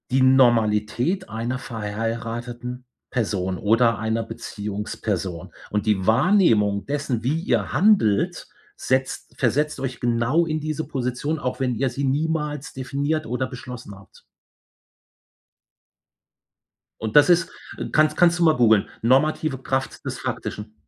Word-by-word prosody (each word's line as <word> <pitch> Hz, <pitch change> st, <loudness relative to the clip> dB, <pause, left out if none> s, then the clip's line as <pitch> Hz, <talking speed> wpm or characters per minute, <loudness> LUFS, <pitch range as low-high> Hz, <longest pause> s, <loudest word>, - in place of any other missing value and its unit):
Die 130 Hz, +1 st, +3 dB
Normalität 120 Hz, -, +3 dB
einer 115 Hz, +3 st, -3 dB
verheirateten 115 Hz, +2 st, -5 dB, 0.3 s
Person 95 Hz, -6 st, -1 dB
oder 115 Hz, +3 st, +3 dB
einer 110 Hz, +1 st, -1 dB
Beziehungsperson. 105 Hz, -5 st, -5 dB, 0.2 s
Und 105 Hz, -1 st, -1 dB
die 100 Hz, -4 st, +1 dB
Wahrnehmung 110 Hz, -, +3 dB
dessen, 140 Hz, -5 st, -2 dB
wie 145 Hz, +6 st, 0 dB
ihr 170 Hz, -, 0 dB
handelt, 180 Hz, -, +2 dB, 0.3 s
setzt 130 Hz, 0 st, -2 dB
versetzt 145 Hz, +5 st, +1 dB
euch 130 Hz, -3 st, -4 dB
genau 120 Hz, +7 st, +2 dB
in 155 Hz, -1 st, -2 dB
diese 155 Hz, +1 st, -3 dB
Position, 135 Hz, +3 st, -2 dB
auch 130 Hz, -2 st, -3 dB
wenn 125 Hz, -2 st, 0 dB
ihr 135 Hz, +4 st, 0 dB
sie 140 Hz, -, -4 dB
niemals 150 Hz, +1 st, -1 dB
definiert 140 Hz, +4 st, -2 dB
oder 125 Hz, +3 st, -2 dB
beschlossen 125 Hz, -4 st, -9 dB
habt. 95 Hz, +1 st, -18 dB, 2.8 s
Und 110 Hz, -1 st, -4 dB
das 150 Hz, +3 st, +7 dB
ist 170 Hz, -1 st, +4 dB, 0.3 s
äh, -, -, -5 dB
kannst 155 Hz, 0 st, +3 dB
kannst 175 Hz, -1 st, +4 dB
du -, -, +3 dB
mal 160 Hz, -2 st, +5 dB
googeln: 110 Hz, -4 st, +4 dB
„Normative 135 Hz, +4 st, +2 dB
Kraft 135 Hz, 0 st, -3 dB
des -, -, -4 dB
Faktischen“. 105 Hz, +1 st, -5 dB
125 Hz, 125 wpm, -23 LUFS, 110-145 Hz, 2.8 s, das